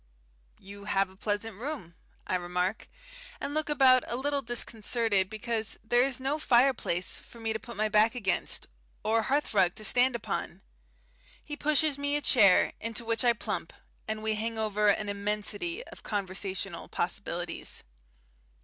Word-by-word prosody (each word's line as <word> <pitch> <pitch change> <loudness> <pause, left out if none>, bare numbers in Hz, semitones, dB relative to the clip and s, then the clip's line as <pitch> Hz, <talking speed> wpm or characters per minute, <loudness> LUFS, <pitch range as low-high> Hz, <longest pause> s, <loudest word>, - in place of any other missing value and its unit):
"You 200 +1 -11
have 195 -2 +1
a - - -18
pleasant 205 +1 -2
room," 245 - -6 0.3
I - - -3
remark, 180 +3 -2 0.5
and 285 - -4
look 310 0 -1
about 260 -3 +5
a - - -2
little 280 +2 0
disconcerted 230 -4 +1
because 220 0 -2
there 240 +2 +3
is 265 0 0
no 275 +4 -1
fireplace 240 - +2
for 235 - -16
me 225 -1 -1
to 220 - -3
put 235 -1 -10
my 215 +1 +2
back 215 +3 +3
against, 195 -7 0 0.4
or 225 +1 +2
hearthrug 215 -10 +2
to 215 - -4
stand 250 +2 +4
upon. 235 - -4 0.8
He 295 - -5
pushes 300 -1 +2
me 285 0 0
a 295 - 0
chair, 205 -10 +5
into 230 +1 -3
which 230 +2 +1
I 240 -1 +5
plump, 230 - -4 0.3
and 215 0 -3
we 220 0 +1
hang 225 +1 -3
over 210 -1 +1
an 205 +1 +2
immensity 210 - -2
of - - -13
conversational 195 -2 -3
possibilities. 175 -1 -4
220 Hz, 155 wpm, -29 LUFS, 200-255 Hz, 0.8 s, about